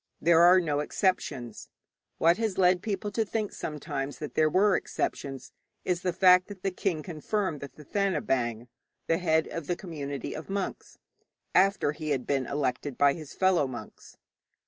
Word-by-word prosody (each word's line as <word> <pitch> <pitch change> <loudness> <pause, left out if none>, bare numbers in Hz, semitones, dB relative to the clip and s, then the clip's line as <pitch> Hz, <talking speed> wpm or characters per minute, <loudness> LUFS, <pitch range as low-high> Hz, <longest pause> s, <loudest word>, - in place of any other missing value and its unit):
There 170 +1 +5
are 180 +2 +7
no 150 -5 0
exceptions. 145 - -2 0.5
What 170 +2 +4
has 220 -4 -1
led 180 -1 +4
people 205 -1 -3
to 225 +2 +1
think 215 0 -3
sometimes 145 -2 -5
that 150 - -6
there 155 0 +3
were 195 +4 +4
exceptions 135 -1 -3 0.3
is 180 -1 0
the 180 - 0
fact 180 0 +5
that 200 -3 -11
the 195 - 0
king 180 -4 -2
confirmed 175 0 -2
the 140 - -7
Thathanabaing 135 - -1 0.4
the 165 - +1
head 160 -3 +2
of 165 -3 -6
the 175 - 0
community 145 -7 -5
of 155 - -8
monks 195 -1 -4 0.6
after 195 -5 +3
he 155 0 -6
had 135 -4 -1
been 135 -3 0
elected 140 -1 -2
by 140 -1 +5
his 155 -2 -9
fellow 185 -6 +3
monks. 125 -2 -10
165 Hz, 165 wpm, -28 LUFS, 145-185 Hz, 0.6 s, are